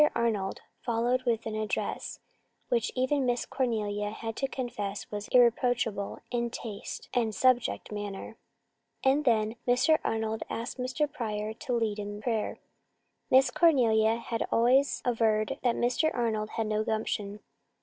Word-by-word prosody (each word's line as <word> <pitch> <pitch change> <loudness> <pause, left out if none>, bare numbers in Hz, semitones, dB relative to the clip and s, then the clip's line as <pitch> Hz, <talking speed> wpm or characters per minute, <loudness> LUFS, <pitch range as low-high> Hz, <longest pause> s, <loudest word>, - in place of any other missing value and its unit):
Arnold 215 -5 0 0.2
followed 240 +2 +1
with 230 -1 +1
an 220 - -3
address 215 -1 -3 0.5
which 235 -2 +1
even 265 +2 +1
Miss 245 -1 0
Cornelia 210 -5 -1
had 225 +1 -5
to 270 - 0
confess 220 -7 -4
was 205 0 -4
irreproachable 240 -4 +2
in 235 -1 0
taste 220 -3 -6
and 225 -4 +1
subject 250 0 +2
matter. 205 +1 -5 0.7
And 275 +3 +3
then 220 -2 +2
Mr. 255 +6 +4
Arnold 220 0 -1
asked 235 +3 -4
Mr. 255 +3 0
Pryor 220 -6 -3
to 250 +3 -4
lead 220 -3 0
in 205 0 -5
prayer. 220 -1 -1 0.7
Miss 265 +2 +5
Cornelia 230 -9 +4
had 230 -1 -3
always 255 +4 +3
averred 220 -3 +1
that 245 -2 +2
Mr. 250 +6 +2
Arnold 220 -3 -1
had 225 -1 0
no 215 0 0
gumption. 210 -2 -2
230 Hz, 140 wpm, -29 LUFS, 215-250 Hz, 0.7 s, Miss